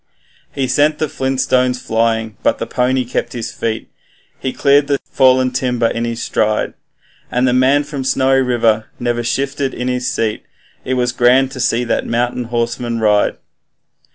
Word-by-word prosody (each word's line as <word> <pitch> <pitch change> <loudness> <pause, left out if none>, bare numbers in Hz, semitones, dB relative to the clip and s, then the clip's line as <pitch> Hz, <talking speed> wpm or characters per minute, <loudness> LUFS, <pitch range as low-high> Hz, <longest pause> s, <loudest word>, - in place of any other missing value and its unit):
He 135 - -1
sent 145 +4 +2
the 155 - -1
flint 130 -1 -2
stones 125 -1 +1
flying, 110 -2 0
but - - +1
the - - -3
pony 130 +1 0
kept 125 - -3
his 120 -2 -4
feet, 110 -1 -3 0.5
He 130 - -2
cleared 140 +1 +3
the 140 -1 +1
fallen 130 -1 +4
timber 125 -2 0
in 115 +1 -2
his 115 0 -3
stride, 110 0 0 0.6
And 125 +1 +1
the 125 - +2
man 130 +3 +3
from 145 -2 -5
Snowy 135 0 +2
River 115 -3 +1
never 120 -1 -1
shifted 135 +2 -2
in 125 - -3
his 125 0 -1
seat 110 -2 -1 0.4
It 130 - -1
was 125 -1 +1
grand 125 +2 +3
to 135 - -8
see 120 -1 +1
that 120 - -1
mountain 120 +1 -1
horseman 120 0 -2
ride. 105 -2 +2
125 Hz, 170 wpm, -17 LUFS, 115-130 Hz, 0.6 s, fallen